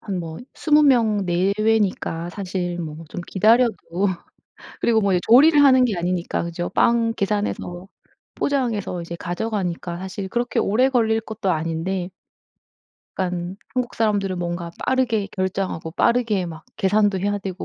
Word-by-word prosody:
한 195 -4 -4
뭐 165 -2 -6 0.2
20 300 -1 +3
명 225 -8 +3
내외니까 190 -2 0
사실 180 -3 -4
뭐 160 0 -7
좀 175 - -6
기다려도 225 +3 +3 1.0
그리고 225 -2 +3
뭐 200 -2 +1
이제 180 - +2
조리를 290 +5 +7
하는 260 -2 +6
게 215 -6 0
아니니까 175 0 -1
그죠? 170 +1 -4
빵 230 -1 +2
계산해서 195 -3 -2 0.5
포장해서 230 -10 -1
이제 170 0 -7
가져가니까 175 -2 -3
사실 190 +1 -5
그렇게 240 +4 -1
오래 245 +6 +3
걸릴 225 -4 +2
것도 220 -3 -3
아닌데 165 +3 -2 1.1
약간 180 0 -3 0.2
한국 250 -1 -2
사람들은 200 -4 0
뭔가 175 0 -3
빠르게 240 -6 +1
결정하고 185 -4 -3
빠르게 220 -4 +1
막 160 -1 -9
계산도 205 -1 +2
해야 205 +1 0
되고 190 -1 -6
195 Hz, 310 characters per minute, -22 LUFS, 175-225 Hz, 1.1 s, 조리를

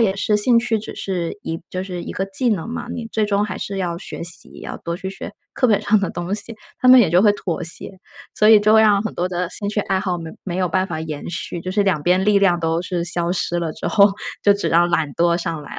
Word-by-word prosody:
也 200 -4 +2
是 210 +1 +1
兴 235 +3 +3
趣， 230 -2 0
只 210 - -8
是 180 -2 -3
一 165 0 -4
就 185 - -3
是 180 -2 -6
一 - - -6
个 195 - -2
技 195 +6 -1
能 200 -2 -2
嘛， 240 - -5
你 230 -2 -5
最 215 -1 +1
终 205 0 +1
还 205 -3 -5
是 195 -1 -4
要 170 -2 -2
学 180 - -7
习， 170 0 -2
要 - - -7
多 170 0 -4
去 190 +1 -6
学 - - -8 0.2
课 255 - +2
本 210 - +3
上 215 -1 +2
的 195 - -1
东 175 +3 -3
西。” 225 +2 -7 0.3
他 255 - +3
们 255 0 +9
也 205 - +3
就 180 +3 +4
会 210 - +6
妥 175 -5 -4
协， 165 +3 +1 0.4
所 215 - +3
以 220 - +8
就 215 +1 +3
会 220 - +7
让 205 -2 +4
很 220 - -5
多 180 +1 -1
的 180 -1 -2
兴 200 +1 -5
趣 210 - -2
爱 190 -1 -1
好 185 -2 -2
没 165 -1 -7
没 180 -2 -4
有 185 -1 0
办 185 +3 0
法 160 -3 -5
延 155 -1 -6
续， 175 0 -3
就 185 - -5
是 205 +2 +1
两 185 -7 0
边 185 +3 +2
力 205 -1 +4
量 185 -3 +3
都 165 +1 0
是 180 -2 -3
消 175 0 0
失 175 -1 -1
了 165 - -2
之 - - -6
后， 200 -1 +5 0.3
就 205 - +6
只 200 - -2
让 175 +1 +3
懒 155 -4 0
惰 170 0 +2
上 165 -3 -4
来 - - -10
了。 - - -5
185 Hz, 300 characters per minute, -20 LUFS, 170-205 Hz, 0.4 s, 们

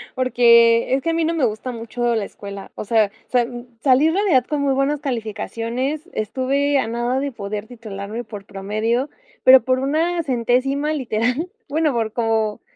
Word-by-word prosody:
porque 235 -2 +4
es 270 - +2
que 330 - 0
a - - +1
mí 330 0 +1
no 330 - 0
me 320 -4 -1
gusta 225 +2 -1
mucho 235 +1 -2
la 220 - 0
escuela. 200 0 -9
O - - -6
sea, 215 -1 +2 0.2
sal 245 0 -1
salí 270 +2 +4
en 320 - +1
realidad 360 - +3
con 295 -1 -1
muy 280 -1 +2
buenas 275 +2 0
calificaciones. 245 - -3
Estuve 270 +6 0
a 225 - -1
nada 240 +3 -1
de 280 -1 -3
poder 210 0 -5
titularme 220 -1 -7
por 210 -3 -9
promedio, 215 +7 -2 0.3
pero 260 0 +8
por 255 +2 +1
una 325 +6 0
centésima 270 +3 0
literal, 250 +4 -1 0.2
bueno, 310 +1 +1
por 225 -3 -2
cómo 225 -2 0
245 Hz, 175 wpm, -21 LUFS, 225-280 Hz, 0.3 s, pero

